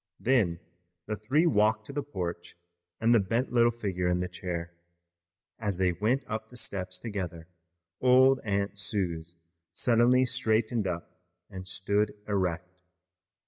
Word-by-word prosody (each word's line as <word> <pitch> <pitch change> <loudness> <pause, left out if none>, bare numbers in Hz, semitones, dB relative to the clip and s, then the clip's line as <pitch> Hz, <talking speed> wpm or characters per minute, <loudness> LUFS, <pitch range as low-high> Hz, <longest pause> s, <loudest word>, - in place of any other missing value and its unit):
Then 105 -10 +2 0.5
the 105 - -2
three 130 - +2
walked 110 -5 +3
to 140 - -8
the 145 - -1
porch 90 -12 -5 0.4
and 115 +2 +4
the 115 - +6
bent 115 +7 -1
little 120 -1 +5
figure 95 -6 -2
in 90 0 +1
the 90 - -1
chair. 90 -2 -5 0.9
As 105 -5 -1
they 95 -1 +2
went 110 +10 0
up 110 0 -4
the 125 - -6
steps 90 -5 -3
together 90 -7 -5 0.5
old 130 +1 +6
Aunt 100 -1 -1
Suse 85 -5 -2 0.3
suddenly 125 +2 +3
straightened 110 -2 +1
up 85 -2 -6 0.3
and 95 -1 -7
stood 100 +3 0
erect. 90 -2 -2
105 Hz, 140 wpm, -29 LUFS, 90-115 Hz, 0.9 s, the